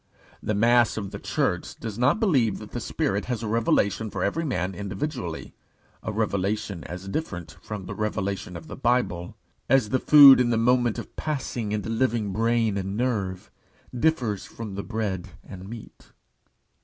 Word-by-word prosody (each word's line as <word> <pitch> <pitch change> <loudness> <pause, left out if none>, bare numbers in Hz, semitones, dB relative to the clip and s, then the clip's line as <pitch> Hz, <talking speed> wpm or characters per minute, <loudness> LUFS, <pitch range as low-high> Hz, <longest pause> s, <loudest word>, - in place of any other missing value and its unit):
The 105 - -1
mass 120 +2 +4
of 100 -3 -4
the - - -6
Church - - -1
does 110 -1 -6
not 135 - +3
believe 135 - +2
that 105 - -10
the 120 - -3
Spirit 100 -3 -1
has 120 -2 -3
a - - -2
revelation 110 -1 +1
for - - -3
every 165 - 0
man 95 - -1
individually 95 - -5 0.5
a - - -3
revelation 100 -3 -1
as 90 +2 -7
different 95 - -4
from 105 -3 -6
the 100 - -5
revelation 95 -3 -3
of 80 - -11
the - - -8
Bible, 115 -8 0 0.3
as 130 -4 +4
the 130 - +1
food 140 -2 +9
in 120 - +2
the 115 - +2
moment 120 0 +2
of - - -8
passing 130 -7 -3
into 105 +1 -2
living 115 -3 0
brain 115 -1 +1
and 95 +1 -3
nerve 105 -7 -2 0.4
differs 120 -7 +1
from 110 -3 -8
the 100 - -3
bread 105 -5 -3 0.2
and 95 +1 -9
meat. 115 -1 -11
110 Hz, 170 wpm, -25 LUFS, 100-120 Hz, 0.5 s, food